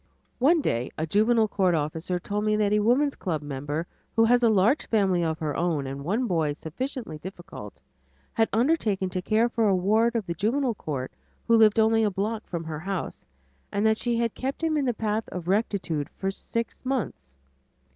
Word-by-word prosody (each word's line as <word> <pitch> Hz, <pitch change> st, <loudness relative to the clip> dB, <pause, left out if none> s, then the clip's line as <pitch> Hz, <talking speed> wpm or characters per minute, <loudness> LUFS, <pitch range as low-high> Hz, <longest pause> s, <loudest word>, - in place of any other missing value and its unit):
One 310 Hz, +6 st, +4 dB
day 120 Hz, -, -1 dB
a 160 Hz, -, -1 dB
Juvenile 220 Hz, +5 st, +3 dB
Court 185 Hz, -4 st, +2 dB
officer 160 Hz, +4 st, -2 dB
told 205 Hz, +4 st, -3 dB
me 215 Hz, 0 st, +2 dB
that 210 Hz, -1 st, +2 dB
a 210 Hz, -, +4 dB
woman's 255 Hz, +7 st, +2 dB
club 160 Hz, -5 st, -3 dB
member, 145 Hz, +3 st, -3 dB, 0.3 s
who 225 Hz, -, +5 dB
has 245 Hz, +2 st, +4 dB
a 235 Hz, -, +5 dB
large 220 Hz, +7 st, +3 dB
family 190 Hz, -5 st, +2 dB
of 160 Hz, -1 st, -1 dB
her 155 Hz, -2 st, -3 dB
own 165 Hz, -5 st, 0 dB
and 135 Hz, +1 st, -5 dB
one 215 Hz, -, 0 dB
boy 165 Hz, -8 st, 0 dB
sufficiently 165 Hz, -, -5 dB
difficult, 175 Hz, -, -9 dB, 0.5 s
had 225 Hz, -1 st, +2 dB
undertaken 220 Hz, -, +1 dB
to 185 Hz, -, -2 dB
care 220 Hz, +5 st, +2 dB
for 230 Hz, -2 st, +1 dB
a 195 Hz, -, +4 dB
ward 220 Hz, +6 st, +2 dB
of 225 Hz, -4 st, 0 dB
the 170 Hz, -, -3 dB
Juvenile 240 Hz, -, 0 dB
Court 140 Hz, -10 st, -5 dB, 0.4 s
who 230 Hz, -, +5 dB
lived 220 Hz, 0 st, +5 dB
only 225 Hz, 0 st, +4 dB
a 210 Hz, -, +3 dB
block 210 Hz, +3 st, -3 dB
from 170 Hz, -2 st, -4 dB
her 160 Hz, -2 st, -5 dB
house, 190 Hz, +1 st, -5 dB, 0.4 s
and 200 Hz, +2 st, 0 dB
that 220 Hz, 0 st, +3 dB
she 240 Hz, -1 st, 0 dB
had 230 Hz, -1 st, 0 dB
kept 270 Hz, +5 st, -4 dB
him 320 Hz, -1 st, +1 dB
in 290 Hz, -2 st, +1 dB
the 245 Hz, -, +1 dB
path 215 Hz, 0 st, -2 dB
of 175 Hz, -2 st, -6 dB
rectitude 190 Hz, -7 st, 0 dB
for 195 Hz, 0 st, -3 dB
six 230 Hz, +4 st, -4 dB
months. 185 Hz, -, -3 dB
205 Hz, 195 wpm, -26 LUFS, 165-230 Hz, 0.5 s, who